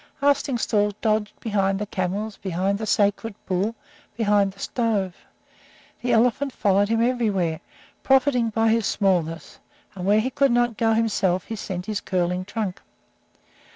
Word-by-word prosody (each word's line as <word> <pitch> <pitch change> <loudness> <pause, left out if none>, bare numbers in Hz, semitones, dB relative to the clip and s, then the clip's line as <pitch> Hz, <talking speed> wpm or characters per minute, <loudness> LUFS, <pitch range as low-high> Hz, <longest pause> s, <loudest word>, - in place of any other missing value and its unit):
Arstingstall 240 -8 +1
dodged 215 -2 -1
behind 195 -3 0
the 210 - -3
camels, 200 +2 -3
behind 190 +2 -1
the 220 - -4
sacred 205 +1 +1
bull, 195 +5 -1 0.4
behind 205 -3 +2
the 195 - -21
stove. 205 -6 -1 0.9
The 245 - -1
elephant 245 +4 +2
followed 200 0 +2
him 225 0 +2
everywhere, 205 -10 0 0.4
profiting 265 -3 +3
by 225 +1 +1
his 225 -2 +2
smallness, 165 -5 -1 0.3
and 185 - -7
where 210 +2 +5
he 255 +4 -1
could 275 0 +2
not 240 -1 +2
go 225 +1 +2
himself 195 -5 +1
he 225 - -6
sent 185 -3 -5
his 210 -1 -3
curling 180 0 -1
trunk. 205 -3 -4
210 Hz, 145 wpm, -24 LUFS, 195-230 Hz, 0.9 s, where